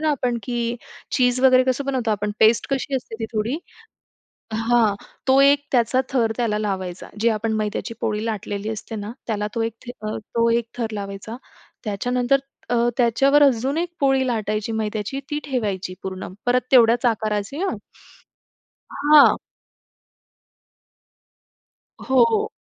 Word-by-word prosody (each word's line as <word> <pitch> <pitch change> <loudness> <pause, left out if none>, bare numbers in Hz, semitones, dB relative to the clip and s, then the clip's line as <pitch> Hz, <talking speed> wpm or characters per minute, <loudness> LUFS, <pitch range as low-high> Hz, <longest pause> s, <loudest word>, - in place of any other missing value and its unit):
ना 310 -1 +1
आपण, 245 -4 0
की 240 +1 -2 0.4
चीझ 250 -1 +2
वगैरे 255 -1 +6
कसं 260 +2 0
बनवतो 255 -5 -1
आपण 210 0 -1
पेस्ट 220 0 +5
कशी 275 0 -1
असते 245 -3 -7
ती - - -1
थोडी 220 +5 -1 1.0
हां. 225 -1 +2 0.3
तो 265 +1 +5
एक 285 +1 +4
त्याचा 250 +2 +3
थर 235 -5 +1
त्याला 215 -3 0
लावायचा, 190 -3 -4
जी 235 - +4
आपण 220 0 -1
मैद्याची 215 +1 -2
पोळी 215 0 -1
लाटलेली 210 -1 -3
असते 220 +1 -6
ना, 205 +1 -5 0.2
त्याला 210 -2 -1
तो 230 - 0
एक 225 -1 -2 0.3
तो 230 +2 -1
एक 235 0 +1
अ, 235 - -24
थर 230 - 0
लावायचा. 200 +3 -6 0.5
त्याच्यानंतर 245 +6 +1 0.3
अ, 245 - +1 0.2
त्याच्यावर 270 +5 +4
अजून 270 +2 +2
एक 345 0 -2
पोळी 270 -1 +3
लाटायची 215 -1 -2
मैद्याची, 215 +4 -3
ती 295 - -1
ठेवायची 205 -9 -2
पूर्ण 190 0 -5 0.2
परत 250 +1 +3
तेवढ्याच 240 0 +5
आकाराची 215 +2 -1
हां 390 - -1 1.4
हां. 295 -2 +8 2.7
हो, 265 - -2
हो. 220 - +1
230 Hz, 140 wpm, -22 LUFS, 215-255 Hz, 2.7 s, हां